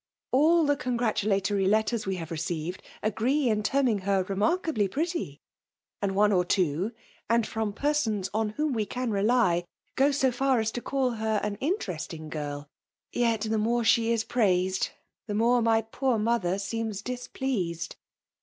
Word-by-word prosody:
— - - -66
all 320 +5 +4
the 290 0 +3
congratulatory 210 -6 0
letters 215 +1 +1
we 190 -1 -1
htfvc 165 -2 -6
received, 165 +2 -3 0.2
agree 245 +7 +1
in 215 -1 +1
terming 245 -1 +2
her 195 0 +1
remark 205 - 0
ably 220 -11 +1
pretty; 335 - -3 0.6
and 195 -1 -1
one 210 +1 +4
or 180 -3 +3
two, 180 +2 0 0.4
and 230 -1 +3
fibni 220 -1 -2
pemons 235 -10 0
on 220 0 0
whom 295 +6 -1
we 220 -3 0
can 250 +2 -3
rely, 200 -4 +2 0.3
go 275 +2 +4
so 270 -2 +2
far 260 0 +2
as 220 0 0
to 240 - -4
call 265 -1 0
be^ 220 -2 0
an 210 -1 -1
interestmg 175 - -3
girL 145 -1 -5 0.4
Yet, 230 -3 +1
the 220 0 0
more 235 +2 +1
sht^ 225 0 +4
is 230 -1 +1
praised^ 190 -5 +1 0.4
the 205 - -2
more 235 +3 +3
my 225 -1 +3
poor 250 +2 0
mother 210 -4 +1
seems 215 0 -3
dia* 250 0 -4
pleased.' 180 -11 -2
220 Hz, 165 wpm, -27 LUFS, 195-250 Hz, 0.6 s, all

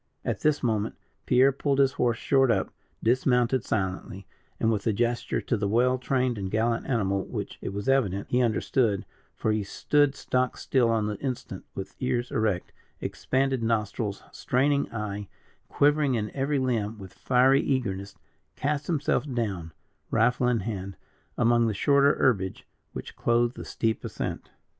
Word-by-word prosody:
At - - -1
this 150 -1 +1
moment, 110 -2 0 0.3
Pierre 130 +2 +5
pulled 140 +1 0
his 135 -1 +4
horse 120 -4 0
short 135 0 +3
up, 100 -5 +1 0.3
dismounted 125 +1 +2
silently, 95 -1 -3 0.3
and 110 - +2
with 105 -1 -1
a 110 - +3
gesture 120 +3 0
to - - -1
the 105 -2 -1
well 125 +4 +2
trained 125 -3 0
and 95 -1 -3
gallant 115 +3 0
animal, 100 -7 0
which, - - -6
it - - -4
was 100 +1 -5
evident, 105 -8 +1
he 125 - +3
understood 115 -2 +1 0.3
for 110 - 0
he 110 0 +1
stood 145 +7 +1
stock 130 0 -1
still 125 -4 +2
on 110 -2 +1
the 105 -1 -3
instant, 125 -8 -5
with 95 - -6
ears 125 -1 -1
erect, 110 -5 0 0.3
expanded 130 -1 -1
nostril, 110 -2 0 0.2
straining 140 +3 +1
eye, 105 -3 -4 0.4
quivering 145 -2 +3
in 105 -2 -2
every 140 +1 0
limb 115 -5 -1
with 95 -3 -11
fiery 130 +2 +3
eagerness 100 -7 -2 0.4
cast 145 +1 -1
himself 150 -3 0
down, 100 -9 -2 0.4
rifle 125 +2 +2
in 120 -3 +2
hand, 95 -2 -5 0.4
among 120 0 +3
the 110 - -1
shorter 140 +5 +4
herbage 95 -7 0 0.3
which - - -7
clothed 120 +1 +1
the - - -7
steep 110 -1 -1
ascent. - - -5
120 Hz, 155 wpm, -27 LUFS, 105-130 Hz, 0.4 s, Pierre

